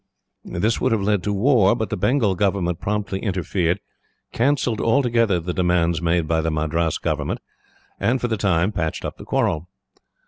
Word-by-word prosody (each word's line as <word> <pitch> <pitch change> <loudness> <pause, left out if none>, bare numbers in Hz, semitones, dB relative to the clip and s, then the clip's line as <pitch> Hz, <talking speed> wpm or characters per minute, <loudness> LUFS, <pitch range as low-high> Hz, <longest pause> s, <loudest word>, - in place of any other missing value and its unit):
This 110 +7 -1
would 130 - +2
have 105 -3 0
led 105 -1 +1
to 105 - 0
war, 105 -1 +4
but 110 -2 -3
the - - 0
Bengal 125 -7 +2
government 90 -3 0
promptly 105 -2 -2
interfered, 90 -2 -1 0.5
cancelled 125 -3 +1
altogether 115 -6 +2
the 90 +1 -4
demands 85 -2 +1
made 85 -1 +1
by 80 0 +1
the 80 - -1
Madras 80 +1 0
government, - - -2 0.6
and 125 +3 +1
for 120 - -1
the 115 - 0
time 95 -2 +1
patched 80 -6 -3
up - - -5
the - - -11
quarrel. 80 +2 0
95 Hz, 170 wpm, -22 LUFS, 85-110 Hz, 0.6 s, war